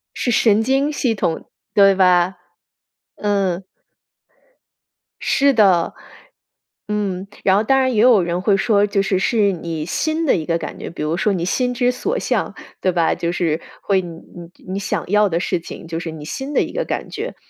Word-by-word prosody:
是 245 - -1
神 220 -2 +3
经 270 +5 +1
系 250 -5 0
统， 170 -5 -2 0.3
对 195 -1 +6
吧？ 180 -1 +3 0.8
嗯。 195 -3 -1 1.6
是 280 0 +3
的， 195 -8 +3 0.9
嗯。 200 -2 -2 0.2
然 190 - +4
后 205 - +3
当 270 +4 +3
然 260 -1 +1
也 210 - +2
有 230 -4 +6
人 170 +1 -2
会 200 0 +3
说， 205 0 +2
就 200 -1 0
是 195 -1 0
是 205 0 +2
你 165 -3 -4
心 315 - -1
的 - - +4
一 160 -3 -4
个 165 - +1
感 - - -7
觉， - - -6
比 165 - -6
如 155 +2 -1
说 205 +3 +1
你 170 -2 -2
心 245 +7 0
之 245 0 +2
所 420 - -2
向， - - -1 0.3
对 185 - +2
吧？ 170 -2 +2
就 170 - -2
是 165 -2 0 0.2
会 195 -2 +2
你 170 -2 -8 0.2
你 175 0 -11 0.2
你 195 - -2
想 200 - -2
要 210 +2 +3
的 170 -2 0
事 180 -1 -1
情， 165 - -10
就 165 0 -4
是 165 - -5
你 155 -2 -9
心 270 - -5
的 - - +4
一 - - -5
个 - - -2
感 - - -4
觉。 - - -5
195 Hz, 205 characters per minute, -20 LUFS, 175-230 Hz, 1.6 s, 对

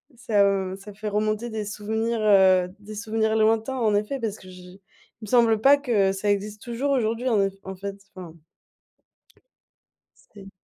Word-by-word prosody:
ça 200 -5 +1
ça 200 +1 -12
fait 210 +1 -7
remonter 215 +3 -1
des 215 -2 -4
souvenirs, 220 +2 -3
heu 190 -3 +4
des 210 +1 -11
souvenirs 220 0 -1
lointains 225 +4 +1
en 215 -4 +1
effet, 215 +7 -1
parce 220 -3 -3
que 185 - -16
je 180 0 -13 0.4
il - - -7
me - - -11
semble 230 -2 +3
pas 275 +5 +6
que 220 -9 +1
ça 205 +1 -1
existe 205 +1 -3
toujours 250 +4 -3
aujourd'hui 235 -1 0
en 215 -5 +2
eff 195 0 0
en 190 0 -7
fait 200 +1 -7 0.2
enfin. 175 -3 -9 2.0
C'est 195 -1 -12
210 Hz, 170 wpm, -24 LUFS, 195-225 Hz, 2.0 s, pas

